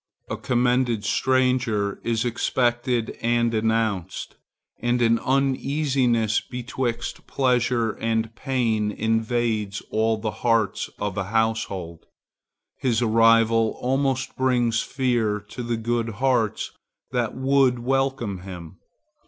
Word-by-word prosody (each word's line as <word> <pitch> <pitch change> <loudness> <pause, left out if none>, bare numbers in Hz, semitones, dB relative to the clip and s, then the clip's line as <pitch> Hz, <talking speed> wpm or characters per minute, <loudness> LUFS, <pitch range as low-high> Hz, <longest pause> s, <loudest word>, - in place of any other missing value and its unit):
A - - 0
commended 125 -2 +1
stranger 125 -5 +1
is 115 0 0
expected 120 0 0
and 120 0 +1
announced, 110 -5 -1 0.4
and 120 +1 +1
an 115 -1 +3
uneasiness 135 -4 +1
betwixt 125 -1 -4
pleasure 125 -3 +1
and 115 +1 -2
pain 115 -5 0
invades 110 -2 0
all 110 0 +1
the 110 0 -3
hearts 115 -4 +1
of 105 -2 -3
a 95 - -2
household. 100 -6 -2 0.7
His 120 -2 +1
arrival 115 0 +4
almost 135 0 0
brings 120 -4 +2
fear 120 -6 0
to 125 - -6
the 120 -1 -2
good 115 0 -1
hearts 120 -2 0 0.4
that 120 -3 -1
would 130 -1 +3
welcome 130 -5 -1
him. 90 -2 -10
115 Hz, 105 wpm, -24 LUFS, 110-125 Hz, 0.7 s, arrival